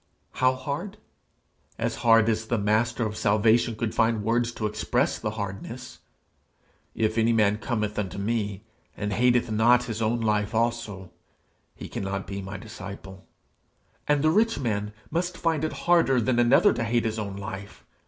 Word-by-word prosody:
How 130 0 +2
hard? 140 +9 -5 0.8
As - - -2
hard 115 -1 +5
as 110 0 0
the 120 - 0
Master 110 +3 +1
of 105 -1 -3
salvation 110 +3 +2
could 110 0 -3
find 115 -2 +1
words 115 +2 +1
to 110 - -4
express 105 - 0
the 110 - -2
hardness: 100 +5 -6 1.0
'If 110 0 0
any 115 +1 +3
man 105 -1 +2
cometh 105 -2 -2
unto 100 -2 -4
me, 105 -1 -2 0.3
and 105 -1 -2
hateth 120 +1 +2
not.... 120 +3 +4
his 115 -2 -5
own 115 +2 +1
life 105 -1 0
also, 115 -5 -2 0.6
he - - -8
cannot 95 0 -4
be 100 0 -5
my 95 +1 -6
disciple.' 95 -2 -9 0.8
And 145 -1 +2
the 155 - +4
rich 225 +5 +2
man 105 -4 -2 0.2
must 175 +2 -1
find 160 -3 0
it 155 - 0
harder 165 -7 +4
than 120 +1 +1
another 120 0 +5
to 120 - -2
hate 115 0 0
his 110 0 -2
own 100 -2 -4
life. 100 0 -8
110 Hz, 165 wpm, -26 LUFS, 105-120 Hz, 1.0 s, hard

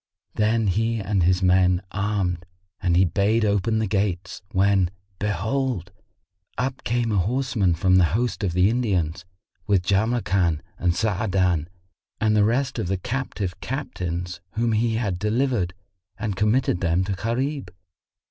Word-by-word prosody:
Then 110 +1 +2
he 110 +4 +1
and 100 -1 0
his 90 +2 +2
men 90 0 +4
armed 95 -4 -1 0.3
and 85 -3 +2
he 95 - +5
bade 105 +6 +2
open 105 +2 +1
the 110 - +1
gates 95 -3 -2
when, 95 -1 +3 0.3
behold, 105 0 -1 0.7
up 130 +1 -2
came 115 +1 0
a 100 - +2
horseman 110 -3 +1
from 95 +2 +3
the 90 - +5
host 120 -2 -1
of 90 -4 0
the 90 +2 +4
Indians, 95 -8 0 0.4
with 95 -4 +2
Jamrkan 95 -6 +1 0.2
and 85 -1 +1
Sa'adan 95 -5 +1 0.5
and 110 -1 +2
the 105 - +5
rest 130 +5 0
of - - -2
the 95 +1 0
captive 105 -4 -4
captains 90 -10 -4
whom 115 +1 +1
he 110 +1 +1
had 100 -6 -1
delivered, 105 -4 0 0.4
and 105 -4 -3
committed 105 -2 +1
them 85 +1 +2
to 95 - -3
Gharib. 120 +2 -2
100 Hz, 145 wpm, -24 LUFS, 90-115 Hz, 0.7 s, he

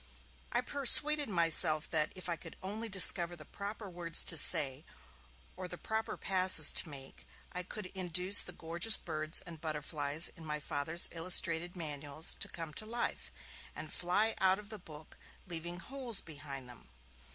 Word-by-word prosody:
I - - -1
persuaded 290 +1 +5
myself 165 -3 +4
that, 155 -2 0
if 185 - -11
I 170 - -3
could - - -11
only 215 +4 -7
discover 175 -3 +4
the 155 -2 -14
proper 205 +1 -9
words 170 -2 0
to 165 - 0
say 140 -2 +5 0.7
or 185 0 -9
the 175 - -9
proper 220 +4 -6
passes 185 -5 +2
to - - +2
make, 135 - -10 0.2
I 180 - -5
could 205 +3 -10
induce 185 +1 +4
the - - -5
gorgeous 170 +7 +2
birds 155 -1 -6
and 165 -3 -12
butterflies 150 0 -1
in 165 - -14
my 150 -1 -5
Father's 150 +4 +1
illustrated 170 0 +2
manuals 150 -1 -3
to - - -4
come 165 -3 -8
to - - -12
life, 235 +2 -5 0.4
and 155 0 -7
fly 205 +6 -1
out 190 0 +1
of 210 0 -13
the 215 - -8
book, 155 -3 -16 0.3
leaving 175 -1 -4
holes 250 -1 -7
behind 140 -4 -9
them. 120 - -14
170 Hz, 165 wpm, -31 LUFS, 155-190 Hz, 0.7 s, persuaded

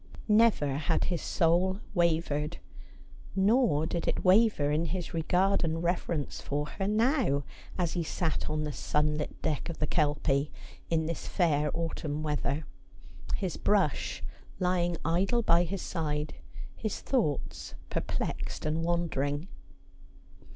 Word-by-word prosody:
Never 210 -11 +4
had 160 +2 +1
his 175 -3 -1
soul 180 +3 +2
wavered. 165 -3 +1 0.8
Nor 195 - +3
did 170 +1 -2
it - - -1
waver 185 -6 +5
in 155 +3 +1
his 175 +2 -3
regard 180 +4 +2
and 165 0 -1
reverence 170 -4 -1
for 145 +1 -2
her 195 +6 -3
now, 220 - +2 0.3
as 175 -3 0
he 175 - 0
sat 160 0 -1
on 155 0 -1
the 150 - -2
sunlit 150 +1 -1
deck 155 +1 -1
of 170 - -5
the 150 - 0
Kelpie 145 -2 +1 0.4
in 160 -1 +1
this 165 0 -4
fair 150 -5 +2
autumn 155 -2 -2
weather, 150 0 -1 0.7
his 185 -4 -2
brush 195 -8 +1 0.3
lying 175 -1 +1
idle 195 +9 +2
by 170 -4 +5
his 190 +2 -4
side, 150 -3 -2 0.4
his 215 -2 -3
thoughts 205 - -1 0.2
perplexed - - -3
and 155 +2 0
wandering. 165 -3 0
165 Hz, 130 wpm, -30 LUFS, 150-185 Hz, 0.8 s, waver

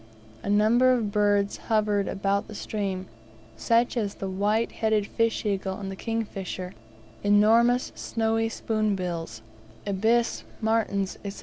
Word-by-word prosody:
A - - -5
number 225 +5 +4
of 225 -5 0
birds 205 -1 +2
hovered 210 -2 +2
about 200 +2 -1
stream, 195 -3 -3 0.5
such 230 - +2
as 210 -4 -1
the 195 - -5
white 205 +4 0
headed 220 -2 +1
fish 230 +2 0
eagle 195 -1 -1
and 195 -1 -5
the - - -6
kingfisher, 195 -4 -4 0.5
enormous, 225 +4 +4
snowy 225 0 -1
spoonbills, 185 - -2 0.4
ibis, 220 +4 +1 0.2
martins, 215 -3 0
&c. 195 - -9
210 Hz, 120 wpm, -26 LUFS, 195-225 Hz, 0.5 s, number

